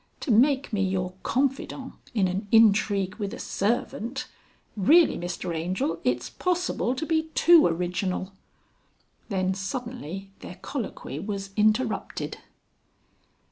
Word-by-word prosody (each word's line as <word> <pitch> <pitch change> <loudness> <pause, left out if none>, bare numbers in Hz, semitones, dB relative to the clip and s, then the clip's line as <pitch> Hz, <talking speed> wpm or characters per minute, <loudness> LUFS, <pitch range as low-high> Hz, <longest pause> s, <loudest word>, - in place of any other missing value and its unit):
"To 275 - -1
make 265 +3 +3
me 205 - +1
your 185 -1 -1
confidant 270 0 -1 0.2
in 195 -4 +3
an 190 +3 -3
intrigue 205 -3 +4
with 200 -3 -4
a - - -10
servant. 235 +4 -2 0.5
Really 305 - +5
Mr 175 0 -4
Angel 165 0 -1
it's 125 0 0
possible 360 -8 -1
to 315 - -3
be 320 0 0
too 340 -2 +7
original...." 180 +2 -2 1.0
Then 190 -2 0
suddenly 195 - -5
their 180 - -9
colloquy 225 - -5
was 195 +1 -5
interrupted. 215 +2 0
205 Hz, 115 wpm, -26 LUFS, 185-255 Hz, 1.0 s, too